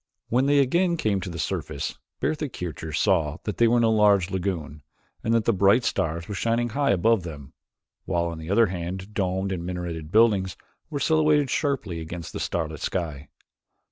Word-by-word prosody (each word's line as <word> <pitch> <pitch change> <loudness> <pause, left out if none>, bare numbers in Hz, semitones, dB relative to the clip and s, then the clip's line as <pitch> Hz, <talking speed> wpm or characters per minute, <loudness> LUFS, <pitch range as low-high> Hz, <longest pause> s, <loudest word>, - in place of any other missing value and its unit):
When 130 +4 +2
they 145 0 +4
again 170 +6 +3
came 105 -9 0
to 90 - -5
the 85 - -6
surface, - - -3 0.2
Bertha 150 -2 -1
Kircher 80 - -6
saw 80 -3 +1
that 105 - -4
they 120 - +5
were 120 +2 +3
in 120 - +3
a 115 - +4
large 100 -4 +4
lagoon 85 -6 -3 0.4
and 115 - 0
that 115 -2 +2
the 115 - +3
bright 100 +5 +4
stars 85 -3 -1
were - - -5
shining 115 +4 0
high 140 +5 0
above 100 +3 +3
them, 75 -4 -9 0.5
while 85 +1 0
on 85 -1 -5
either 100 +8 +3
hand 95 +2 -5
domed 95 -1 -1
and 90 -3 -3
minareted 85 -3 -5
buildings 100 -4 +3 0.3
were 145 -3 -3
silhouetted 150 -1 +3
sharply 120 - -1
against 80 0 -7
the - - -4
starlit 80 -2 -2
sky. 75 -6 -3
95 Hz, 180 wpm, -25 LUFS, 85-115 Hz, 0.5 s, they